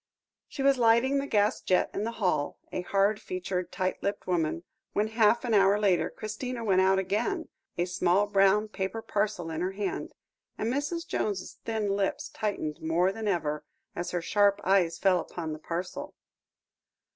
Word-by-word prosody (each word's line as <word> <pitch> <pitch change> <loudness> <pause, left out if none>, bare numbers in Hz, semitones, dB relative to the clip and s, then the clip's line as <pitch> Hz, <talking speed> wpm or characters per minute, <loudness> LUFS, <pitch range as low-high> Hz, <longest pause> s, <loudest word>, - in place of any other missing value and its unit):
She 270 - -5
was 275 -1 +4
lighting 235 +4 +4
the 275 - -3
gas 210 -2 +2
jet 185 - +2
in 205 - -2
the 230 - -3
hall, 180 -9 0
a - - -2
hard 200 +3 +1
featured, 185 -1 -3
tight 185 0 -2
lipped 200 - -2
woman, 165 -2 0 0.3
when, 210 +1 +1
half 225 +2 +3
an 235 - 0
hour 200 0 +5
later, 195 -4 +2
Christina 235 +3 -5
went 190 -3 +4
out 190 0 +4
again, 210 - -1 0.3
a 175 - +1
small 180 +2 +2
brown 200 +1 +3
paper 210 +2 -4
parcel 205 -5 -1
in 160 +1 -3
her 185 +2 -1
hand; 200 0 -3 0.5
and 230 +3 -1
Mrs. 295 +5 -2
Jones's 200 -3 -3
thin 220 -2 -1
lips 200 -1 -1
tightened 195 -8 -3
more 170 +4 +2
than 220 +1 -5
ever 150 -6 -1 0.3
as 175 - -3
her 175 -1 -2
sharp 205 +2 +3
eyes 180 -3 +3
fell 190 -2 +3
upon 160 -1 -5
the 155 - -7
parcel. 175 +3 -5
195 Hz, 170 wpm, -28 LUFS, 180-215 Hz, 0.5 s, hour